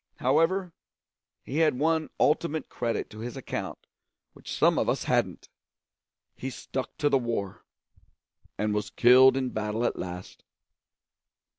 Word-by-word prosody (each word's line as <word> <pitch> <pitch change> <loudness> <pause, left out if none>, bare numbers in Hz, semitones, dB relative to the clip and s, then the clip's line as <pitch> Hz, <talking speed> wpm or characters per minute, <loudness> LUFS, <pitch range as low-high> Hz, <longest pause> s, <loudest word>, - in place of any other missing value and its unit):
However, 165 +7 +1 0.7
he 140 - -5
had 155 -5 +3
one 160 +2 +1
ultimate 155 0 +1
credit 120 -1 -2
to 110 - -10
his 120 +4 -6
account 135 - -5 0.5
which - - -11
some - - +3
of - - 0
us - - 0
hadn't: - - 0 0.9
he 130 - -5
stuck 130 0 -6
to 145 - +1
the 135 -2 +3
war, 115 -6 -4 0.9
and 105 0 0
was 105 0 -2
killed 130 +2 +6
in 130 -1 -1
battle 110 +1 -2
at - - -1
last. 90 0 -7
130 Hz, 135 wpm, -27 LUFS, 110-150 Hz, 0.9 s, killed